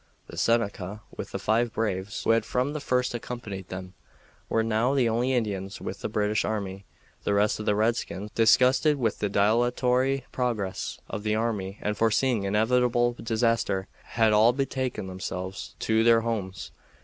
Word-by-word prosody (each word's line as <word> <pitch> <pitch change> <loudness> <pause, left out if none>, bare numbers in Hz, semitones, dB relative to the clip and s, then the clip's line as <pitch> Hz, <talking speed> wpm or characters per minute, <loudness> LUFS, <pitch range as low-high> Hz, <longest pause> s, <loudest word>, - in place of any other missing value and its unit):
The - - -11
Seneca, 105 -3 0
with - - -6
the - - -2
five 115 +2 +1
braves 100 -3 -2
who - - +3
had 115 -1 +3
from 125 +5 -1
the 150 - -3
first 125 -3 0
accompanied 110 -6 -6
them, 90 0 -7 0.6
were 115 - +2
now 115 +4 +1
the 130 -4 +3
only 120 +3 +1
Indians 100 -5 -2
with - - -6
the - - -3
British 105 0 0
army. 100 -3 -3 0.4
The 100 - +1
rest 105 +1 +2
of 105 - -5
the 105 - +3
redskins, 105 -2 -1
disgusted 130 +6 +4
with 120 -4 -1
the 105 - 0
dilatory 125 +5 +2
progress 110 -7 -2
of 105 - -5
the 105 0 0
army 105 -4 -2
and 105 0 0
foreseeing 115 0 +2
inevitable 120 +3 +2
disaster, 115 -4 0 0.3
had 110 -2 +4
all 110 +3 +5
betaken 130 -4 -2
themselves 95 0 -6
to 110 0 +2
their 115 0 +5
homes. 105 -5 -4
110 Hz, 160 wpm, -27 LUFS, 100-120 Hz, 0.6 s, all